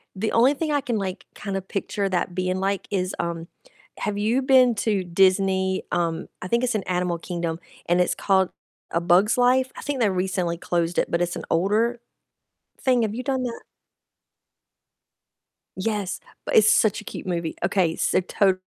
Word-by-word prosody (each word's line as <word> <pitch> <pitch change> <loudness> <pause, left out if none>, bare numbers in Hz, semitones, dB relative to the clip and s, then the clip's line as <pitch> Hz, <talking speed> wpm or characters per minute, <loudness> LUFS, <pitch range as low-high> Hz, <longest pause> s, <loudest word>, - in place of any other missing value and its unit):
the 215 +3 -1
only 250 +5 +5
thing 305 +1 -2
I 290 - +2
can, 245 -4 -2
like, 190 -1 -4
kinda 195 -2 -4
picture 195 +1 -3
that 180 -1 -1
being 185 0 -1
like 195 0 -1
is, 185 -2 -1
um 170 -1 -3 0.5
Have 205 -1 -2
you 225 +6 +1
been 255 -3 +5
to 205 -3 0
Disney, 190 +1 +2
um, 170 -1 -1
I 180 - -5
think 235 +5 +1
it's 250 - +1
in 200 - -1
Animal 180 -1 -1
Kingdom, 170 -2 -3 0.3
and 175 +1 +3
it's - - +1
called 190 -2 +2 0.4
A 170 - 0
Bug's 185 +7 +4
Life? 255 +1 +3
I - - -6
think 280 -2 -2
they 215 -4 +3
recently 180 -2 -1
closed 170 0 -1
it, - - -1
but 170 - +1
it's 175 0 -1
an - - -6
older 220 +7 +2 0.8
thing. 250 -3 +3
Have 215 0 -2
you 250 - -4
done 265 -2 -1
that? 235 -2 -4 2.1
Yes. 200 -1 -2 0.3
But - - -1
it's 215 0 +7
such 215 0 +3
a - - -13
cute 190 - -8
movie. 170 -2 -2
Okay, 175 -3 +1
so - - +1
totally. 190 0 +1
190 Hz, 180 wpm, -24 LUFS, 180-225 Hz, 2.1 s, it's